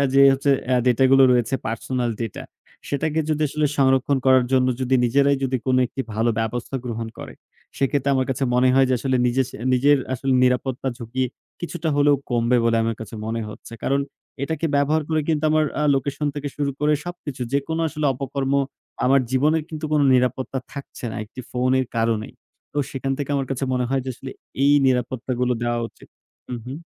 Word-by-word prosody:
যে 140 - +6
হচ্ছে 140 +1 +1 0.2
এ - - +5
ডেটাগুলো 130 +2 +5
রয়েছে, 125 +2 +1
personal 120 +2 -2
data। 115 -4 -4 0.5
সেটাকে 150 +3 0
যদি 155 0 0
আসলে 150 +1 0
সংরক্ষণ 135 0 +3
করার 130 -1 +6
জন্য 130 -1 +4
যদি 130 +1 +1
নিজেরাই 140 +3 +3
যদি 130 0 0
কোনো 130 0 +3
একটি 130 - -6
ভালো 115 +2 +2
ব্যবস্থা 120 +4 -3
গ্রহণ 115 -1 -4
করে। - - -8 0.4
সেক্ষেত্রে 140 0 +1
আমার 130 -1 +1
কাছে 135 +1 -1
মনে 125 +1 +4
হয় 135 0 +5
যে - - +4
আসলে 130 +1 0
নিজের 130 +2 +2
স - - -19 0.2
নিজের 145 +3 +4 0.2
আসলে 135 +2 -1
নিরাপত্তা 125 +1 0
ঝুঁকি 125 +2 -2 0.4
কিছুটা 175 -1 -3
হলেও 145 0 +5 0.2
কমবে 120 +1 +2
বলে 115 0 +3
আমার 115 -1 -1
কাছে 110 0 -8
মনে 115 +1 -2
হচ্ছে। 105 - -12
কারণ 140 +1 +2 0.4
এটাকে 160 +2 -1
ব্যবহার 150 +2 +2
করে 155 -1 +1
কিন্তু 155 -1 +1
আমার 155 0 +3 0.2
আ - - +1
লোকেশন 140 +2 -2
থেকে 145 0 -4
শুরু 145 -1 0
করে 150 +1 +3
সবকিছু 150 -7 -6
যেকোনো 160 +4 -1
আসলে 155 -1 -2
অপকর্ম 135 +1 -3 0.5
আমার 135 +1 +5
জীবনের 150 +4 +2
কিন্তু 155 -1 -6
কোনো 150 -2 +4
নিরাপত্তা 130 +1 0
থাকছে 140 -2 -9
না - - -6
একটি 110 +4 -10
ফোনের 130 +1 +1
কারণেই। 115 -1 0 0.4
তো 145 - -2
সেখান 135 0 -2
থেকে 145 0 -3
আমার 135 -1 0
কাছে 135 +1 -1
মনে 125 -1 +1
হয় 135 0 +1
যে 130 - -3
আসলে 130 +1 -8 0.3
এই 145 - +5
নিরাপত্তাগুলো 125 0 0
দেওয়া 120 0 0
উচিত। - - -19 0.5
উহুম। 125 +3 -7
130 Hz, 185 wpm, -22 LUFS, 125-140 Hz, 0.5 s, যে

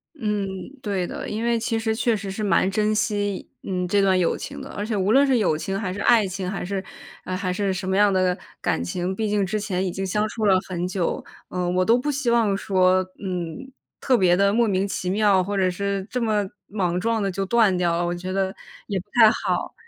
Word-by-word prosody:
嗯， 210 -7 -1 0.4
对 195 -4 -1
的， - - -6
因 220 +2 -3
为 235 -1 +2
其 225 0 -1
实 220 -1 0
确 230 -1 +1
实 200 -1 -5
是 215 +3 -4
蛮 195 -2 +3
珍 215 +1 +1
惜， 205 -3 -1
嗯， 180 -1 -2
这 200 +2 +2
段 190 -1 +3
友 170 - +1
情 - - -7
的。 - - -8
而 205 - -4
且 215 -1 -2
无 195 +3 +1
论 275 +2 +6
是 265 -3 +3
友 180 -8 +2
情 195 +5 -3
还 190 -4 -3
是 200 - -5
爱 225 0 +4
情， 185 0 -4
还 195 -2 -4
是， 190 +1 -3 0.4
唉， 185 - -3
还 185 -1 -2
是 195 +1 0
什 185 0 -4
么 190 - +1
样 205 -1 +5
的 185 -1 +2 0.2
感 - - 0
情， 180 - -2
毕 215 +2 -1
竟 205 -2 +1
之 215 +3 -1
前 190 -3 -1
已 - - -1
经 190 +2 -4
相 210 +3 0
处 220 0 -4
了 190 -2 +5
很 180 -1 -2
久， 185 -2 -2 0.3
嗯， 180 -1 -1
我 185 - +3
都 230 +4 +4
不 290 +4 -1
希 270 -4 0
望 220 -4 +3
说， 185 -2 +2 0.2
嗯， 185 +8 -4 0.3
特 255 -3 +3
别 180 -2 +4
地 200 +1 +3
莫 230 +2 +3
名 195 -1 +1
其 185 -2 -3
妙， 200 -2 +3
或 200 +1 -3
者 185 -1 +2
是 200 +1 -2
这 250 - -2
么 215 -3 +1 0.2
莽 180 -4 -1
撞 225 +1 0
地 195 - 0
就 195 +1 -3
断 220 -4 +3
掉 170 -1 +1
了， 175 - 0
我 175 - -1
觉 185 +1 -5
得 195 0 -1 0.3
也 200 -3 -1
不 180 - -8
太 225 -3 +8
好。 - - -2
195 Hz, 260 characters per minute, -23 LUFS, 185-215 Hz, 0.4 s, 太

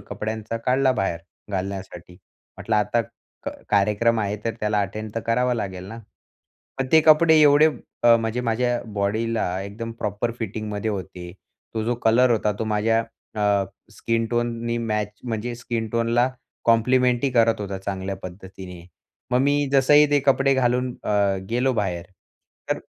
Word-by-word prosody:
कपड्यांचा 110 +1 -5
काढला 130 +3 +2
बाहेर 95 -8 -1 0.3
घालण्यासाठी. 95 -2 -5 0.4
म्हटलं, 110 - -2
आता 105 +3 +1 0.4
क - - -2 0.2
कार्यक्रम 105 +3 +2
आहे 105 0 -1
तर 115 -2 -1
त्याला 105 0 +1
अटेंड 105 +2 -5
तर 115 - -1
करावा 125 +2 +2
लागेल 95 -5 -4
ना. 115 - -8 0.8
मग 135 - 0
ते 160 - +8
कपडे 160 +1 +6
एवढे 145 +1 +6 0.4
अ, 120 -1 +7
म्हणजे 115 +1 -2
माझ्या 120 +1 0
बॉडीला 110 +3 0 0.2
एकदम 115 +4 -6
प्रॉपर 105 +3 -2
फिटिंगमध्ये 110 -1 -3
होते. 90 -3 -6 0.4
तो 110 - -1
जो 120 +2 0
कलर 120 +3 +4
होता 105 -2 +2
तो - - -1
माझ्या 110 +1 +1 0.4
अ, 100 -1 +2 0.3
स्किनटोननी 115 0 -1
मॅच 105 -3 -1 0.2
म्हणजे 120 +1 -3
स्किन 115 -2 -4
टोनला 115 +2 +2 0.4
कॉम्प्लिमेंटरी 125 +3 +3
करत 115 -3 +3
होता 100 -1 -4
चांगल्या 95 0 -4
पद्धतीने. 90 -1 -9 0.5
मग 125 - +3
मी 145 +1 +2
जसंही 145 +2 +6
ते 145 -1 +4
कपडे 135 0 +4
घालून 125 0 +1
अ, 100 -2 +2
गेलो 125 +3 +1
बाहेर, 90 -5 -2 0.6
तर - - +1
115 Hz, 145 wpm, -23 LUFS, 105-120 Hz, 0.8 s, ते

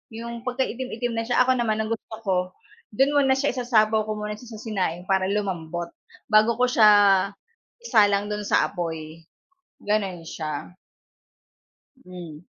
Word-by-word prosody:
yong 235 0 -6
pagkaitim-itim 250 -1 -2
na 225 0 -1
siya 245 +1 +4
ako 260 - +2
naman 220 -2 0
ang 220 - -5
gusto 225 0 -5
ko 190 -2 +1 0.6
do'n 270 +4 +3
muna 270 -2 +4
siya 275 +2 0
isasapaw 220 -4 +2
ko 215 - -2
muna 210 0 -4
siya 240 -2 -11
sa 215 - -10
sinaing 185 -6 -2
para 190 -1 +2
lumambot 175 -4 -3 0.4
bago 215 +2 +5
ko 250 - +5
siya 215 -4 +6 0.9
isalang 205 - +3
do'n 210 0 -3
sa - - +3
apoy, 165 -2 -6 0.6
gano'n 195 -5 -1
siya. 155 +1 -6 1.3
Hmm. 175 -4 -9
215 Hz, 145 wpm, -24 LUFS, 180-235 Hz, 1.3 s, siya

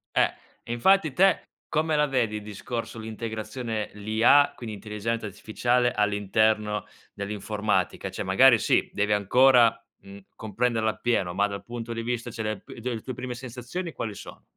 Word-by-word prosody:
Eh, - - +3 0.3
infatti, 155 +7 +3
te, 190 +5 +4 0.3
come 155 0 +1
la 150 0 +3
vedi, 120 -6 0
il - - -6
discorso 115 +3 -6
l'integrazione 110 0 -4
l'IA, 110 +7 +4
quindi 110 -3 -7
intelligenza 105 +2 -4
artificiale, 120 +4 0
all'interno 105 0 +1 0.3
dell'informatica? 105 +1 -2
Cioè, - - -5
magari, 120 +6 +6
sì, - - +2
devi 105 +1 +1
ancora, 120 +4 +5 0.2
mhmm, 100 +1 -12 0.2
comprenderla 110 +1 0
appieno, 105 -7 -1
ma 100 +3 +2
dal 100 -1 -6
punto 120 -1 -6
di 115 - -4
vista 120 0 -3
cioè 115 -1 -5
le 110 -1 -2
p - - -12
tue 125 +1 -3
le 110 - -6
tue 130 - -6
prime 125 +1 -5
sensazioni 130 +8 -6
quali 105 -3 -4
sono? - - -11
115 Hz, 155 wpm, -26 LUFS, 105-125 Hz, 0.3 s, magari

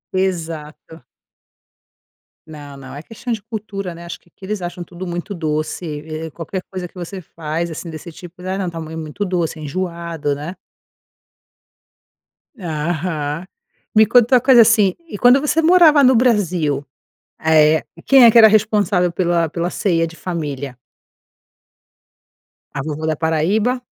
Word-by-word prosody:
Exato. 165 -5 -4 1.4
Não, 145 -2 -10
não. 135 -1 -11
É 145 - -7
questão 225 +7 -7
de 225 -2 -2
cultura, 200 -4 -6
né, 170 - -11
acho 170 - -7
que - - -32
aqui 190 - -14
eles 205 -1 -3
acham 175 0 -5
tudo 175 +2 -8
muito 175 +3 -5
doce 155 0 -3
e 155 +1 -6
qualquer 170 +4 -5
coisa 185 -2 -5
que - - -30
você 185 +1 -7
faz, 165 +1 -4
assim, 165 +2 -7
desse 160 +1 -8
tipo, 175 +2 -13
né, 185 +1 -3
não. 190 -2 -2
Tamanho 160 -1 -7
muito 155 +6 -5
doce, 175 -4 -2
enjoado, 170 -2 -3
né. 155 +6 -7 2.0
Aham. 155 -1 -3 0.5
Me 220 0 +7
conta 245 +2 +5
uma 245 - +5
coisa 255 -2 +7
assim, 215 -4 +4
e 205 - -7
quando 245 +2 +6
você 300 +3 +1
morava 320 -4 +6
no 260 0 +6
Brasil, 180 - +1 0.6
eh, 155 0 +4 0.2
quem 270 -2 +7
é 230 - +9
que 235 - +4
era 220 -1 +10
responsável 205 -4 +2
pela 170 -2 +1
pela 170 +1 -2
ceia 165 -4 0
de 165 - -12
família? 145 -8 -5 1.9
A - - -4
vovó 155 +1 -4
da 160 0 0
Paraíba? 195 - 0
175 Hz, 150 wpm, -19 LUFS, 155-205 Hz, 2.0 s, era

